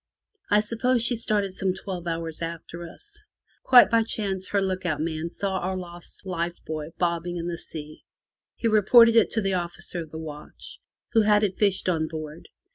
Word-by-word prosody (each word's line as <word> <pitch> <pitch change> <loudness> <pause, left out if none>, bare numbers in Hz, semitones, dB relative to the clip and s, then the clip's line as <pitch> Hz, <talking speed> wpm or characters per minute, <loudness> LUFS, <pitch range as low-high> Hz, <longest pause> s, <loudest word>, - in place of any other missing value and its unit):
I 210 0 +5
suppose 235 +3 +1
she 245 - +2
started 210 -4 -1
some 190 -1 -1
twelve 185 -2 -6
hours 165 -1 -3
after 170 +1 -6
us. 415 - -12 0.4
Quite 245 -2 +7
by 230 0 +5
chance 195 -4 -3
her 200 - +1
look 185 -1 -1
out 165 -4 -1
man 160 +1 -2
saw 190 +1 -2
our 185 +1 -2
lost 175 +1 -9
life 175 -2 -2
buoy 155 -1 -4
bobbing 175 0 -1
in 170 0 -4
the 170 -1 -4
sea. 155 -1 -9 0.5
He 230 - -1
reported 230 +2 +6
it 225 - +5
to 220 - 0
the 195 -1 0
officer 175 0 -3
of 160 - -9
the 160 - -8
watch, 160 - -9 0.3
who 225 - +5
had 210 0 +4
it 195 -3 -1
fished 200 -3 +1
on 160 -3 +1
board. 155 0 -7
185 Hz, 190 wpm, -25 LUFS, 165-210 Hz, 0.5 s, Quite